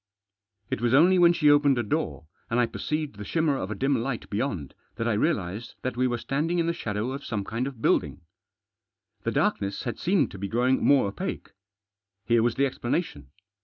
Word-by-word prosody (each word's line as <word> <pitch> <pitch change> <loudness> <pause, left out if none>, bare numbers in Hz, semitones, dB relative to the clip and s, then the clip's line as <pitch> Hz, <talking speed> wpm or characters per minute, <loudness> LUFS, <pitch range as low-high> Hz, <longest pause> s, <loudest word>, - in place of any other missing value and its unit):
It - - -2
was 120 +1 +3
only 180 +5 +6
when 170 -1 +7
she 150 -4 +4
opened 145 -2 +4
a 120 - +1
door, 90 - -2 0.2
and 115 - +1
I 120 - +4
perceived 150 +1 -4
the 105 - -6
shimmer 160 +5 +1
of 95 - -4
a 110 - -3
dim 135 +2 +1
light 120 -1 -4
beyond, 100 - -2 0.2
that 115 - -2
I 115 - +2
realised 105 - -1
that 130 - -2
we 130 +1 +2
were 120 -1 -1
standing 150 +8 -1
in 170 - +2
the 170 - 0
shadow 110 -2 -3
of 140 +1 -6
some 105 -4 -3
kind 115 +6 -3
of 130 -5 -9
building. 75 +2 +1 1.0
The - - +1
darkness 100 0 0
had 120 -3 -4
seemed 190 +3 +2
to 100 - -9
be 100 - -3
growing 125 +5 +1
more 140 -5 +5
opaque. 100 - -5 0.7
Here 120 -1 +3
was 120 0 +1
the 140 - +2
explanation. 120 - -3
120 Hz, 200 wpm, -26 LUFS, 105-145 Hz, 1.0 s, when